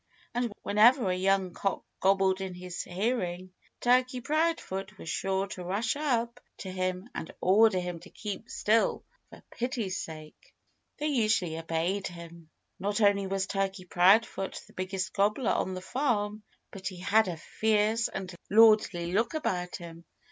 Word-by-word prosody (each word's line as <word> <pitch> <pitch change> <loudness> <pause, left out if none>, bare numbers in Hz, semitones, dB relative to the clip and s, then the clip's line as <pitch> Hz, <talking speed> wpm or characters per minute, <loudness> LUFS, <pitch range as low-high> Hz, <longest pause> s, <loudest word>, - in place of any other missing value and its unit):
And 240 -1 -1
whenever 215 0 +5
a - - 0
young 190 -1 +1
cock 195 - -2 0.2
gobbled 190 0 +3
in 190 -2 -5
his 180 0 -6
hearing 185 -2 -2 0.3
Turkey 255 +1 +3
Proudfoot 245 - -1
was - - -10
sure 195 +2 0
to 180 - -6
rush 200 +9 -1
up 240 -6 -1 0.2
to 190 - -6
him 185 +2 -2
and 160 - -6
order 200 +1 +5
him 180 -1 -4
to - - -14
keep 210 -2 -6
still, 220 +2 +1 0.3
for - - -14
pity's 230 -6 -2
sake! 155 -1 -11 0.4
They 300 - -3
usually 215 - +1
obeyed 165 +4 -1
him. 170 -2 -11 0.3
Not 205 +3 -1
only 200 -2 +3
was 195 0 -1
Turkey 195 -1 -2
Proudfoot 195 +3 +3
the - - -20
biggest 185 0 -3
gobbler 210 +4 +2
on 185 - -1
the 185 - -5
farm, 215 -3 -1 0.3
but 195 -2 -6
he 185 - -5
had 205 +4 +3
a 175 -3 -3
fierce 220 +5 +1
and 185 -1 -6 0.2
lordly 210 -5 +5
look 225 +9 +1
about 180 -12 -2
him. 170 -1 -10
195 Hz, 155 wpm, -29 LUFS, 180-220 Hz, 0.4 s, whenever